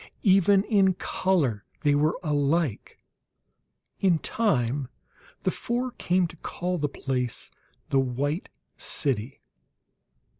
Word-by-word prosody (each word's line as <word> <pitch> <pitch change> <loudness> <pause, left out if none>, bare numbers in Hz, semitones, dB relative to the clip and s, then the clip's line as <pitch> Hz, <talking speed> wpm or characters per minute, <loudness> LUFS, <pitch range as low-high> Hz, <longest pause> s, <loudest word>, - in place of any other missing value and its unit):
Even 195 0 +5
in 195 -4 +3
color 155 - 0 0.2
they 145 - +3
were 150 +3 +2
alike; 145 - 0 1.0
in 185 -4 +4
time 135 - 0 0.5
the - - +1
four 245 +2 -2
came 180 -5 +1
to 165 - -7
call 180 +3 -3
the 145 0 0
place 125 -3 -3 0.4
the 135 - +3
"White 140 +6 -1 0.3
City." 130 -3 -2
155 Hz, 105 wpm, -26 LUFS, 135-190 Hz, 1.0 s, Even